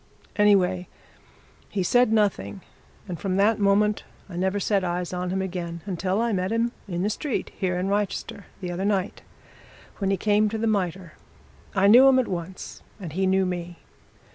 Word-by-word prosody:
Anyway, 185 Hz, -3 st, +3 dB, 0.8 s
he 195 Hz, -3 st, -1 dB
said 245 Hz, +4 st, +3 dB
nothing, 210 Hz, -2 st, 0 dB, 0.5 s
and 175 Hz, -4 st, -5 dB
from 190 Hz, +1 st, -2 dB
that 210 Hz, +3 st, +3 dB
moment 205 Hz, +1 st, +2 dB, 0.2 s
I 185 Hz, -, -9 dB
never 190 Hz, +3 st, 0 dB
set 200 Hz, -1 st, +1 dB
eyes 175 Hz, 0 st, -2 dB
on 180 Hz, 0 st, -2 dB
him 190 Hz, +1 st, -1 dB
again 170 Hz, -2 st, -5 dB
until 190 Hz, +1 st, -1 dB
I 235 Hz, -1 st, +1 dB
met 185 Hz, +1 st, -1 dB
him 230 Hz, +1 st, +1 dB, 0.2 s
in 175 Hz, -1 st, -2 dB
the 205 Hz, -, +1 dB
street 275 Hz, +4 st, -3 dB
here 180 Hz, -2 st, -1 dB
in 180 Hz, +1 st, -1 dB
Wrychester, 200 Hz, 0 st, -2 dB, 0.2 s
the 180 Hz, -1 st, -4 dB
other 175 Hz, +2 st, -3 dB
night, 200 Hz, -1 st, -1 dB, 0.8 s
when 195 Hz, -2 st, 0 dB
he 195 Hz, -, +1 dB
came 210 Hz, +2 st, +2 dB
to 220 Hz, -, -3 dB
the 225 Hz, -, -1 dB
Mitre. 190 Hz, -5 st, -1 dB, 0.6 s
I 190 Hz, 0 st, +3 dB
knew 245 Hz, +6 st, +8 dB
him 265 Hz, -1 st, +6 dB
at 255 Hz, -, +2 dB
once 180 Hz, +1 st, -6 dB, 0.2 s
and 170 Hz, -6 st, -7 dB
he 190 Hz, +2 st, +1 dB
knew 190 Hz, 0 st, +3 dB
me. 175 Hz, -1 st, -4 dB
190 Hz, 180 wpm, -25 LUFS, 180-210 Hz, 0.8 s, knew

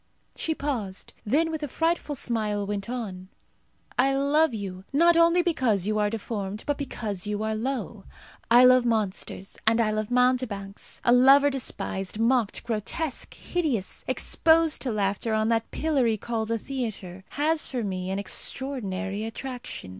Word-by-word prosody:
She 320 Hz, -, -2 dB
paused; 230 Hz, -11 st, -4 dB
then 320 Hz, +8 st, +2 dB
with 315 Hz, -1 st, -4 dB
a 295 Hz, -, -2 dB
frightful 325 Hz, +1 st, -1 dB
smile 215 Hz, -5 st, -1 dB
went 200 Hz, +1 st, -4 dB
on, 200 Hz, -7 st, -5 dB, 0.7 s
"I 270 Hz, +2 st, +4 dB
love 285 Hz, +3 st, +3 dB
you, 195 Hz, -4 st, -6 dB
not 335 Hz, +4 st, +5 dB
only 335 Hz, +1 st, +5 dB
because 245 Hz, -, +1 dB
you 215 Hz, +1 st, 0 dB
are 210 Hz, 0 st, +2 dB
deformed, 210 Hz, -2 st, -4 dB
but 290 Hz, -, 0 dB
because 210 Hz, -8 st, -4 dB
you 210 Hz, +1 st, -2 dB
are 220 Hz, 0 st, -1 dB
low. 255 Hz, +5 st, -3 dB, 0.4 s
I 240 Hz, +2 st, +8 dB
love 255 Hz, 0 st, +6 dB
monsters, 210 Hz, -4 st, -2 dB
and 225 Hz, +1 st, +4 dB
I 220 Hz, -2 st, +2 dB
love 215 Hz, 0 st, -2 dB
mountebanks. 245 Hz, -6 st, 0 dB
A 240 Hz, -, +5 dB
lover 275 Hz, +3 st, +6 dB
despised, 200 Hz, -7 st, -3 dB
mocked, 230 Hz, -1 st, +1 dB
grotesque, 240 Hz, +7 st, -3 dB
hideous, 290 Hz, -, -2 dB
exposed 325 Hz, -1 st, +3 dB
to 255 Hz, -, -1 dB
laughter 210 Hz, +1 st, 0 dB
on 215 Hz, +1 st, +1 dB
that 225 Hz, -1 st, +1 dB
pillory 265 Hz, -8 st, +1 dB
called 225 Hz, 0 st, -3 dB
a 230 Hz, -, +1 dB
theatre, 215 Hz, -8 st, -5 dB
has 310 Hz, +2 st, +1 dB
for 250 Hz, -3 st, -3 dB
me 185 Hz, -2 st, -3 dB
an 190 Hz, -, -1 dB
extraordinary 205 Hz, -3 st, -3 dB
attraction. 245 Hz, -, -6 dB
230 Hz, 155 wpm, -26 LUFS, 205-275 Hz, 0.7 s, I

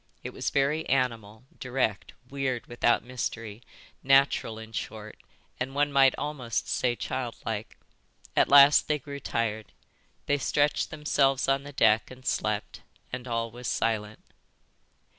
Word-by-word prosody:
It -, -, -5 dB
was -, -, -2 dB
very 140 Hz, +3 st, +1 dB
animal, 115 Hz, -4 st, -1 dB
direct, 125 Hz, -5 st, -2 dB
weird 130 Hz, -3 st, -3 dB
without 120 Hz, -1 st, +1 dB
mystery, 115 Hz, -3 st, -5 dB, 0.4 s
natural 135 Hz, -4 st, +3 dB
in 110 Hz, 0 st, -10 dB
short, 110 Hz, -1 st, -6 dB, 0.4 s
and 130 Hz, +2 st, -3 dB
one 145 Hz, 0 st, +2 dB
might 135 Hz, -1 st, +5 dB
almost 135 Hz, -6 st, -3 dB
say 120 Hz, -1 st, 0 dB
childlike. 115 Hz, -4 st, -5 dB, 0.6 s
At -, -, +3 dB
last 140 Hz, +1 st, +7 dB
they 150 Hz, -, +1 dB
grew 140 Hz, 0 st, -8 dB
tired. 110 Hz, -4 st, -3 dB, 0.5 s
They 145 Hz, 0 st, +1 dB
stretched 145 Hz, +2 st, +1 dB
themselves 140 Hz, -3 st, +1 dB
on 135 Hz, 0 st, +2 dB
the 145 Hz, +1 st, -10 dB
deck 110 Hz, -5 st, +3 dB
and 130 Hz, 0 st, -13 dB
slept, 105 Hz, -6 st, -2 dB, 0.3 s
and 125 Hz, 0 st, -5 dB
all 115 Hz, -1 st, -2 dB
was 120 Hz, +1 st, -7 dB
silent. 110 Hz, -2 st, -2 dB
125 Hz, 135 wpm, -27 LUFS, 115-140 Hz, 0.6 s, last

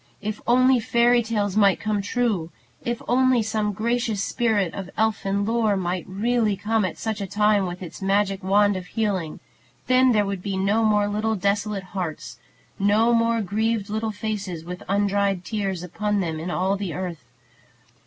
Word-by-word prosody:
If 215 Hz, +1 st, -5 dB
only 255 Hz, +1 st, +5 dB
fairy 240 Hz, +1 st, +3 dB
tales 210 Hz, -4 st, -1 dB
might 200 Hz, -3 st, +4 dB
be 210 Hz, -1 st, +1 dB
true! 205 Hz, -6 st, -1 dB, 0.3 s
If 240 Hz, 0 st, -3 dB
only 255 Hz, -1 st, +3 dB
some 215 Hz, -1 st, -1 dB
gracious 225 Hz, 0 st, -1 dB
spirit 210 Hz, -7 st, 0 dB
of 190 Hz, -2 st, -6 dB
elfin 200 Hz, -2 st, 0 dB
lore 220 Hz, -2 st, +1 dB
might 180 Hz, -1 st, -2 dB
really 215 Hz, +1 st, +1 dB
come 215 Hz, +2 st, 0 dB
at 185 Hz, -, -4 dB
such 220 Hz, -2 st, -3 dB
a 195 Hz, -, -3 dB
time 210 Hz, 0 st, +2 dB
with 180 Hz, +1 st, -6 dB
its 175 Hz, -, -9 dB
magic 195 Hz, 0 st, +1 dB
wand 205 Hz, +1 st, +3 dB
of 185 Hz, -1 st, -6 dB
healing! 190 Hz, -8 st, -2 dB, 0.5 s
Then 255 Hz, +1 st, +4 dB
there 210 Hz, -3 st, +3 dB
would 195 Hz, -2 st, -3 dB
be 195 Hz, 0 st, -3 dB
no 200 Hz, +4 st, +2 dB
more 210 Hz, -1 st, +3 dB
little 215 Hz, +2 st, -1 dB
desolate 200 Hz, +1 st, -1 dB
hearts, 175 Hz, -5 st, -5 dB, 0.4 s
no 215 Hz, +4 st, +3 dB
more 230 Hz, -1 st, +2 dB
grieved 215 Hz, +1 st, -1 dB
little 220 Hz, +1 st, -1 dB
faces 205 Hz, -6 st, -4 dB
with 180 Hz, +1 st, -7 dB
undried 200 Hz, -2 st, +1 dB
tears 195 Hz, -5 st, -2 dB
upon 210 Hz, +4 st, -1 dB
them 165 Hz, -4 st, -2 dB
in 165 Hz, +3 st, -5 dB
all 190 Hz, +3 st, 0 dB
the 195 Hz, -4 st, -4 dB
earth. 175 Hz, -6 st, -5 dB
205 Hz, 170 wpm, -24 LUFS, 190-220 Hz, 0.5 s, only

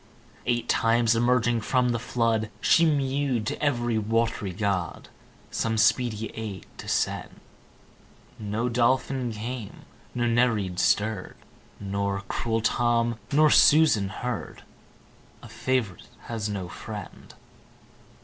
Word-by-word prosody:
Eight 120 Hz, -1 st, 0 dB
times 115 Hz, 0 st, +3 dB
emerging 120 Hz, -1 st, +2 dB
from 125 Hz, +3 st, +1 dB
the 120 Hz, -1 st, 0 dB
flood 115 Hz, -2 st, 0 dB
She 165 Hz, -, +4 dB
mew'd 135 Hz, -5 st, 0 dB
to 110 Hz, -, -4 dB
ev'ry 120 Hz, -5 st, +1 dB
wat'ry 115 Hz, -2 st, -1 dB
god, 95 Hz, -3 st, -2 dB, 0.4 s
Some 110 Hz, -1 st, -1 dB
speedy 110 Hz, -1 st, +1 dB
aid 105 Hz, -5 st, -6 dB
to -, -, -9 dB
send. -, -, -2 dB, 1.0 s
No 110 Hz, +3 st, -2 dB
Dolphin 125 Hz, +1 st, +1 dB
came, 110 Hz, 0 st, -7 dB, 0.3 s
no 120 Hz, -1 st, 0 dB
Nereid 115 Hz, -6 st, +1 dB
stirr'd: 105 Hz, 0 st, 0 dB, 0.4 s
Nor 100 Hz, 0 st, -2 dB
cruel 115 Hz, -1 st, -1 dB
Tom, 120 Hz, 0 st, +1 dB
nor 150 Hz, +1 st, +5 dB
Susan 145 Hz, -11 st, +5 dB
heard. 120 Hz, +2 st, -5 dB, 0.8 s
A -, -, -9 dB
Fav'rite 125 Hz, -9 st, -2 dB, 0.2 s
has 110 Hz, -3 st, -4 dB
not 95 Hz, -3 st, -4 dB
friend! 105 Hz, -4 st, -9 dB
115 Hz, 110 wpm, -26 LUFS, 105-125 Hz, 1.0 s, nor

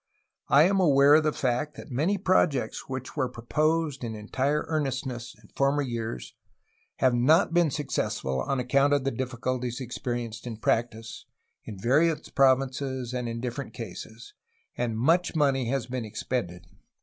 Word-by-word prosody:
I 140 Hz, +4 st, +6 dB
am 195 Hz, +3 st, +3 dB
aware 145 Hz, -4 st, +6 dB
of 155 Hz, +1 st, +6 dB
the 155 Hz, -, +2 dB
fact 135 Hz, +3 st, -1 dB
that -, -, -10 dB
many 160 Hz, +11 st, +1 dB
projects 150 Hz, -, +1 dB
which 130 Hz, -1 st, -5 dB
were 130 Hz, -4 st, 0 dB
proposed 150 Hz, +4 st, 0 dB
in 115 Hz, -2 st, -4 dB
entire 135 Hz, +8 st, -1 dB
earnestness 135 Hz, -5 st, -3 dB
in -, -, -20 dB
former 140 Hz, +1 st, +1 dB
years 115 Hz, -, -5 dB, 0.6 s
have 130 Hz, -1 st, +2 dB
not 155 Hz, +9 st, +4 dB
been 170 Hz, -2 st, +4 dB
successful 65 Hz, -, -2 dB
on 135 Hz, -, -1 dB
account 140 Hz, +3 st, +3 dB
of 140 Hz, -2 st, +2 dB
the 135 Hz, -, 0 dB
difficulties 125 Hz, 0 st, -3 dB
experienced 120 Hz, -2 st, -4 dB
in 115 Hz, -2 st, -5 dB
practice, 115 Hz, 0 st, -2 dB, 0.4 s
in 105 Hz, -, -7 dB
various 150 Hz, -, +2 dB
provinces 130 Hz, -1 st, +1 dB
and 125 Hz, -2 st, -2 dB
in 115 Hz, 0 st, -4 dB
different 125 Hz, +3 st, -5 dB
cases, 115 Hz, +1 st, -9 dB, 0.4 s
and 115 Hz, -2 st, -2 dB
much 165 Hz, +9 st, +2 dB
money 135 Hz, -5 st, +2 dB
has 135 Hz, -2 st, -1 dB
been 125 Hz, -1 st, -4 dB
expended. 105 Hz, -5 st, -4 dB
130 Hz, 150 wpm, -27 LUFS, 120-145 Hz, 0.6 s, I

